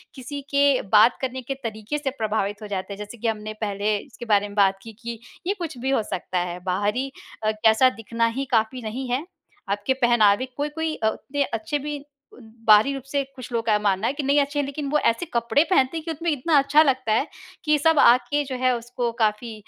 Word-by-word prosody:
किसी 280 +2 -6
के 280 -2 +4
बात 215 +3 +6
करने 260 0 -3
के 265 +3 -4
तरीके 220 +5 -4
से 285 -2 -2
प्रभावित 210 -1 -1
हो 210 - -7
जाते 200 0 -4
हैं, - - -9
जैसे 210 +3 -8
कि 230 - -3
हमने 215 -1 -3
पहले 205 +1 0
इसके 240 +2 -10
बारे 205 0 +3
में 205 - -11
बात 195 -1 +3
की, 225 -1 -10
कि 230 +1 -7 0.3
ये 395 - +2
कुछ 325 -6 -5
भी 260 +2 -3
हो 270 -5 +2
सकता 180 0 -2
है 175 0 -3
बाहरी 210 +8 -1 0.3
कैसा 220 +3 +4
दिखना 230 +1 0
ही 275 - -1
काफ़ी 230 +2 +1
नहीं 245 +4 -5
है। 260 +6 -1 0.4
आपके 205 +6 0
पहनावे 230 0 +4
कोई-कोई 310 +2 -2
अ, 220 - -1
उतने 280 +5 -2
अच्छे 300 0 -3
भी 290 0 -5 0.6
बाहरी 215 +6 +6
रूप 270 - -6
से 280 0 -1
कुछ 255 -1 -9
लोग 230 -1 -1
का 225 - +2
ये 210 - +3
मानना 200 +1 +1
है - - 0
कि 290 0 -4
नहीं, 280 +2 +3
अच्छे 285 +1 -3
हैं, 285 - +1
लेकिन 280 +1 -5
वो 300 - +3
ऐसे 230 +9 +2
कपड़े 235 +5 +3
पहनते 270 -2 +2
हैं 320 - -5
कि 330 - -2
उसमें 330 +2 -2
इतना 295 +2 +2
अच्छा 290 +3 +5
लगता 260 -5 0
है 265 +7 +1 0.4
कि 300 0 +4
सब 320 0 +4
आके 250 +4 +4
जो 260 -1 -5
है 255 -1 +4
उसको 240 0 -3
काफ़ी 220 +1 0
245 Hz, 225 wpm, -24 LUFS, 215-280 Hz, 0.6 s, बात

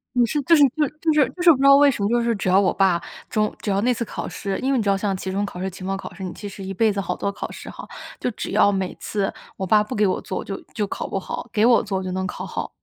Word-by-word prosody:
你 245 - +4
是 295 - -1
就 330 +5 +5
是 295 - +4 0.2
就 305 - +3
是 - - -7 0.4
就 355 - -6
是 345 -2 +8
不 280 - +3
知 270 - -1
道 275 0 +8
为 285 0 +6
什 215 -6 -2
么， - - +2
就 240 +1 +2
是 235 -1 +1
只 195 - -4
要 185 +2 +5
我 190 - +3
爸， 185 -3 +2 0.3
中 215 -1 +1
只 205 - -2
要 195 +1 +1
那 250 +2 +2
次 235 -1 -2
考 - - -5
试 195 -1 -4
因 265 +1 0
为 265 - +2
你 225 - +1
知 205 - -3
道 195 - +4
像 195 0 -1
期 190 0 -4
中 200 +2 -1
考 190 -3 -6
试、 190 +1 -2
期 185 - -10
末 195 +1 -2
考 190 - -8
试， 190 +1 -9
你 185 - -4
其 205 - -8
实 195 -1 -8
一 190 - -5
辈 215 +2 +2
子 200 - -1
好 180 0 -3
多 200 - -2
考 200 - -6
试 - - -10
哈， - - -10 0.3
就 - - -1
只 - - -6
要 205 - +4
每 190 -2 -2
次 200 -2 -2 0.2
我 190 - -2
爸 210 +3 +4
不 235 +4 -6
给 210 - +3
我 185 - 0
做， 185 - -5
我 - - -3
就 195 - -5
就 210 - -1
考 - - -5
不 - - -3
好， - - -6
给 215 +1 +3
我 240 -1 +5
做 195 -2 -3
我 190 - -3
就 185 - -4
能 190 +1 -2
考 - - -6
好。 - - -4
200 Hz, 360 characters per minute, -22 LUFS, 190-235 Hz, 0.4 s, 是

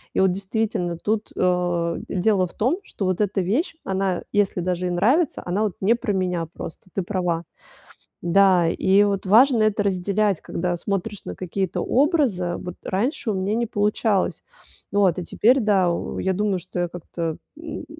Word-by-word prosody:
И - - +2
вот, 190 -1 +4
действительно, 190 -2 -2
тут, 215 +5 -2
э, 175 -2 +1
дело 190 0 +2
в - - -17
том, 265 - +1
что 200 - -5
вот 185 +1 0
эта 205 -1 0
вещь, 240 - 0
она, 190 -1 -1
если 200 -3 +1
даже 180 0 -1
и - - -1
нравится, 245 - +2
она 180 +4 -1
вот 210 -4 -1
не 200 +4 +3
про 235 -2 -2
меня 180 -4 -1
просто, 180 +1 -9
ты 195 - 0
права. 175 -3 -1 0.8
Да, 180 -1 +4
и 190 +4 +3
вот 200 -1 -1
важно 235 +4 +6
это 215 -1 +2
разделять, 200 0 0
когда 175 +1 -2
смотришь 200 +3 -3
на - - -5
какие-то 185 0 -2
образы. 250 - +1
Вот 180 - -6
раньше 230 - -1
у - - -2
меня 190 +2 -1
не 235 +1 0
получалось. 210 -1 0 0.5
Вот, 195 -4 +3
а - - -4
теперь 245 +9 +3
да, 200 -6 +3
о, 170 - -4
я 190 - 0
думаю, 200 0 0
что 175 0 -3
как-то 170 -1 -5 0.2
м 315 -1 -7
195 Hz, 175 wpm, -23 LUFS, 180-210 Hz, 0.8 s, важно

